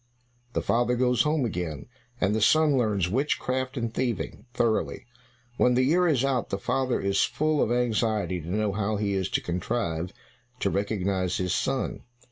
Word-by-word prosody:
The -, -, -1 dB
father 120 Hz, +1 st, +2 dB
goes 125 Hz, -1 st, +2 dB
home 150 Hz, -2 st, +1 dB
again, 90 Hz, -8 st, -4 dB, 0.3 s
and 100 Hz, +1 st, +2 dB
the 110 Hz, -, 0 dB
son 155 Hz, +5 st, +4 dB
learns 105 Hz, -8 st, +1 dB
witchcraft 130 Hz, +3 st, -1 dB
and 115 Hz, -2 st, -2 dB
thieving, 125 Hz, 0 st, -3 dB
thoroughly. 115 Hz, -2 st, 0 dB, 0.5 s
When 125 Hz, 0 st, +4 dB
the 130 Hz, -, +3 dB
year 175 Hz, +7 st, +3 dB
is 135 Hz, -5 st, +2 dB
out, 130 Hz, -3 st, 0 dB
the 95 Hz, -, -1 dB
father 130 Hz, +5 st, 0 dB
is 100 Hz, 0 st, +1 dB
full 150 Hz, +4 st, +1 dB
of -, -, +1 dB
anxiety 110 Hz, -6 st, 0 dB
to 80 Hz, -, -8 dB
know 105 Hz, +2 st, 0 dB
how 105 Hz, +1 st, -1 dB
he 100 Hz, -1 st, -1 dB
is 95 Hz, -2 st, -1 dB
to -, -, 0 dB
contrive 90 Hz, -1 st, -2 dB, 0.5 s
to 100 Hz, -, +1 dB
recognize 95 Hz, -2 st, -1 dB
his 90 Hz, -1 st, -1 dB
son. 135 Hz, 0 st, -1 dB
115 Hz, 170 wpm, -27 LUFS, 100-130 Hz, 0.5 s, son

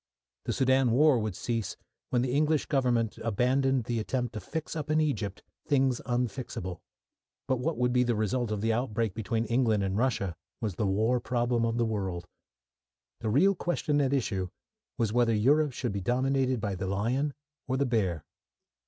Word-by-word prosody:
The -, -, -1 dB
Soudan 130 Hz, -1 st, +3 dB
war 135 Hz, +2 st, +5 dB
would 110 Hz, -4 st, -2 dB
cease 115 Hz, -2 st, -3 dB, 0.3 s
when 120 Hz, -1 st, +2 dB
the 130 Hz, -, -1 dB
English 150 Hz, +1 st, +2 dB
Government 120 Hz, -5 st, +1 dB
abandoned 130 Hz, +4 st, +1 dB
the 115 Hz, 0 st, -2 dB
attempt 125 Hz, +2 st, -2 dB
to 110 Hz, -, -4 dB
fix 160 Hz, +7 st, -5 dB
up 150 Hz, -2 st, -4 dB
in 155 Hz, 0 st, +3 dB
Egypt 110 Hz, -11 st, -1 dB, 0.2 s
things 135 Hz, -4 st, +2 dB
unfixable. 120 Hz, -7 st, -3 dB, 0.7 s
But 130 Hz, -2 st, +1 dB
what 160 Hz, +6 st, -1 dB
would 125 Hz, 0 st, +1 dB
be 125 Hz, -, +4 dB
the 120 Hz, -2 st, +1 dB
result 110 Hz, +3 st, 0 dB
of 105 Hz, -2 st, -2 dB
the 115 Hz, +1 st, +2 dB
outbreak 115 Hz, -3 st, -1 dB
between 115 Hz, +2 st, -1 dB
England 115 Hz, -3 st, +2 dB
and 95 Hz, 0 st, -1 dB
Russia 110 Hz, -7 st, 0 dB, 0.2 s
was 110 Hz, -4 st, -2 dB
the 100 Hz, +4 st, -1 dB
war 110 Hz, +6 st, +2 dB
problem 120 Hz, -1 st, 0 dB
of 115 Hz, 0 st, -1 dB
the 120 Hz, -, +2 dB
world. 95 Hz, -6 st, -3 dB, 0.9 s
The 110 Hz, -, -2 dB
real 170 Hz, -, +4 dB
question 160 Hz, -5 st, 0 dB
at 135 Hz, -2 st, +1 dB
issue 100 Hz, -9 st, 0 dB, 0.5 s
was 110 Hz, -3 st, 0 dB
whether 120 Hz, -2 st, +3 dB
Europe 145 Hz, +7 st, +3 dB
should 120 Hz, -2 st, -2 dB
be 100 Hz, 0 st, -3 dB
dominated 130 Hz, +3 st, +1 dB
by 100 Hz, -2 st, -2 dB
the 95 Hz, 0 st, -3 dB
lion 125 Hz, +9 st, 0 dB, 0.3 s
or 130 Hz, 0 st, 0 dB
the 140 Hz, -, +2 dB
bear. 95 Hz, -, 0 dB
120 Hz, 180 wpm, -29 LUFS, 110-130 Hz, 0.9 s, war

